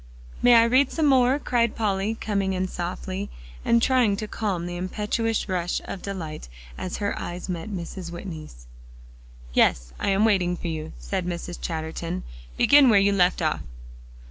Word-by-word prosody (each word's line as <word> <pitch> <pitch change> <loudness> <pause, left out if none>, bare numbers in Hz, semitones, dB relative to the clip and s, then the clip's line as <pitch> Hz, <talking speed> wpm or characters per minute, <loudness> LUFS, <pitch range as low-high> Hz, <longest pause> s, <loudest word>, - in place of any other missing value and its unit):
"May 245 -1 +7
I 230 - +8
read 255 +4 +3
some 320 - 0
more?" 260 -1 +4
cried 235 -5 +1
Polly, 205 0 0
coming 200 -3 -1
in 185 0 -1
softly, 185 +2 -4 0.3
and 235 0 +3
trying 250 -6 +3
to 215 - -4
calm 195 -6 -2
the 175 0 -5
impetuous 210 +5 -1
rush 180 -2 -1
of 190 - -6
delight 160 - -6 0.3
as 180 - -4
her 200 -1 -1
eyes 175 +1 -5
met 180 +3 -4
Mrs. 180 -2 -6
Whitney's. 160 - -8 0.9
"Yes; - - +2
I - - 0
am 195 +2 +3
waiting 180 -5 +2
for 170 - -4
you," 160 -1 -5
said 190 -3 -3
Mrs. 175 0 -5
Chatterton. 165 +2 -4 0.3
"Begin 280 -2 +7
where 215 - +6
you 200 +1 +3
left 180 -1 +2
off." - - 0
190 Hz, 165 wpm, -25 LUFS, 175-220 Hz, 0.9 s, I